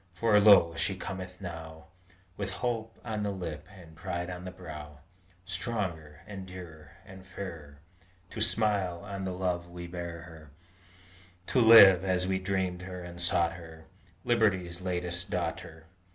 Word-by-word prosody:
For, 105 Hz, +2 st, +4 dB
lo! 100 Hz, -5 st, +7 dB
she 95 Hz, +3 st, 0 dB
cometh 95 Hz, -1 st, -7 dB
now 80 Hz, -3 st, -8 dB, 0.5 s
With 100 Hz, 0 st, -3 dB, 0.2 s
hope 115 Hz, -2 st, -2 dB
on 110 Hz, -2 st, -3 dB
the 105 Hz, -, -1 dB
lip 85 Hz, -6 st, -5 dB
and 90 Hz, -6 st, -14 dB
pride 85 Hz, +2 st, -4 dB
on 90 Hz, 0 st, -7 dB
the -, -, -4 dB
brow, 75 Hz, -5 st, -10 dB, 0.4 s
Stronger, 90 Hz, -6 st, -2 dB
and 95 Hz, -3 st, -8 dB
dearer, 80 Hz, -5 st, -11 dB
and 95 Hz, -1 st, -12 dB
fairer, 85 Hz, -6 st, -8 dB, 0.5 s
To 110 Hz, -, -5 dB
smile 100 Hz, -5 st, +1 dB
on 100 Hz, -2 st, -5 dB
the 95 Hz, -, -2 dB
love 90 Hz, -1 st, -2 dB
we 85 Hz, 0 st, -8 dB
bear 85 Hz, -1 st, -6 dB
her, 80 Hz, -3 st, -13 dB, 1.0 s
To 130 Hz, -, +5 dB
live, 100 Hz, -6 st, +9 dB
as 90 Hz, -1 st, +1 dB
we 95 Hz, 0 st, 0 dB
dreamed 95 Hz, -1 st, -1 dB
her 90 Hz, -1 st, -7 dB
and 85 Hz, 0 st, -8 dB
sought 85 Hz, -1 st, +2 dB
her, 80 Hz, -2 st, -12 dB, 0.4 s
Liberty's 95 Hz, -7 st, +1 dB
latest 90 Hz, -1 st, -2 dB
daughter! 85 Hz, -2 st, -4 dB
90 Hz, 150 wpm, -30 LUFS, 85-95 Hz, 1.0 s, live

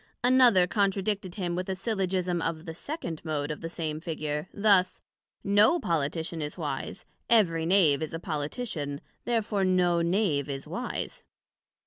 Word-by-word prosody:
Another 245 Hz, -7 st, +6 dB
contradicted 195 Hz, -1 st, 0 dB
him 180 Hz, -4 st, -2 dB
with 185 Hz, +1 st, -3 dB
a 190 Hz, -, -1 dB
Syllogism 185 Hz, -4 st, -1 dB
of 165 Hz, 0 st, -3 dB
the 165 Hz, -, -6 dB
second 170 Hz, -, -5 dB
Mode 150 Hz, -2 st, -2 dB
of 150 Hz, -, -6 dB
the 165 Hz, -, -4 dB
same 155 Hz, -2 st, -4 dB
Figure, 155 Hz, -1 st, -3 dB
thus: 200 Hz, -3 st, +3 dB, 0.4 s
No 205 Hz, -, +4 dB
Politician 165 Hz, -, -2 dB
is 150 Hz, +3 st, -5 dB
wise: 145 Hz, -5 st, -4 dB, 0.2 s
Every 165 Hz, -8 st, +4 dB
Knave 170 Hz, -7 st, +4 dB
is 155 Hz, +1 st, -3 dB
a -, -, -4 dB
Politician, 150 Hz, -, -4 dB, 0.3 s
Therefore 220 Hz, -4 st, 0 dB
no 180 Hz, -2 st, +3 dB
Knave 170 Hz, -6 st, +1 dB
is 135 Hz, -1 st, -5 dB
wise. -, -, -4 dB
175 Hz, 145 wpm, -28 LUFS, 155-200 Hz, 0.4 s, Another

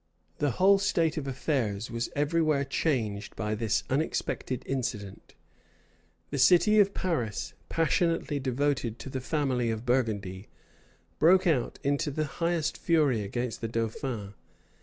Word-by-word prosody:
The 145 Hz, -, +2 dB
whole 195 Hz, +1 st, +6 dB
state 165 Hz, -5 st, +1 dB
of 140 Hz, -3 st, -3 dB
affairs 125 Hz, -6 st, -1 dB
was 115 Hz, 0 st, -2 dB
every 150 Hz, +4 st, +1 dB
where 150 Hz, -3 st, +2 dB
changed 115 Hz, -8 st, -1 dB
by 105 Hz, -1 st, -2 dB
this 110 Hz, -1 st, 0 dB
unexpected 130 Hz, -3 st, -2 dB
incident. 110 Hz, -7 st, -4 dB, 1.0 s
The 140 Hz, -, -2 dB
city 185 Hz, +9 st, +6 dB
of 200 Hz, -1 st, +4 dB
Paris, 125 Hz, -, -2 dB, 0.2 s
passionately 165 Hz, -2 st, +1 dB
devoted 130 Hz, -3 st, -1 dB
to 135 Hz, -, -8 dB
the 130 Hz, -, -3 dB
family 130 Hz, -4 st, 0 dB
of 110 Hz, +1 st, -3 dB
Burgundy, 105 Hz, -6 st, -1 dB, 0.7 s
broke 185 Hz, +4 st, +5 dB
out 150 Hz, -9 st, +1 dB
into 145 Hz, +2 st, +1 dB
the 155 Hz, +2 st, -1 dB
highest 165 Hz, +3 st, -1 dB
fury 150 Hz, -9 st, +2 dB
against 120 Hz, +4 st, -3 dB
the 115 Hz, -, -1 dB
dauphin. 115 Hz, -2 st, -3 dB
135 Hz, 135 wpm, -28 LUFS, 115-160 Hz, 1.0 s, whole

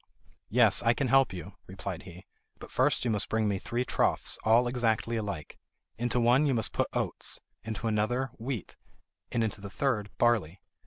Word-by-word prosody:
"Yes, -, -, +5 dB
I 115 Hz, +1 st, +3 dB
can 130 Hz, +1 st, 0 dB
help 135 Hz, -3 st, +5 dB
you," 90 Hz, -3 st, -7 dB
replied -, -, -6 dB
he; -, -, -12 dB, 0.3 s
"but -, -, -11 dB
first -, -, +2 dB
you 120 Hz, -, +2 dB
must 105 Hz, -1 st, +1 dB
bring 110 Hz, -1 st, +1 dB
me 100 Hz, -2 st, 0 dB
three 120 Hz, +5 st, -2 dB
troughs, -, -, 0 dB
all 115 Hz, +2 st, +4 dB
exactly 115 Hz, -2 st, 0 dB
alike. 100 Hz, -9 st, -5 dB, 0.4 s
Into 120 Hz, +1 st, 0 dB
one 125 Hz, +5 st, +4 dB
you 135 Hz, -, +2 dB
must 110 Hz, -5 st, -1 dB
put -, -, +1 dB
oats, -, -, -1 dB, 0.2 s
into 110 Hz, +1 st, -5 dB
another 115 Hz, +4 st, 0 dB
wheat, 120 Hz, -3 st, -4 dB, 0.6 s
and 115 Hz, -, +1 dB
into 105 Hz, -2 st, -3 dB
the 100 Hz, -, -7 dB
third 110 Hz, -3 st, -1 dB
barley. 105 Hz, -7 st, +2 dB
115 Hz, 175 wpm, -29 LUFS, 105-120 Hz, 0.6 s, Yes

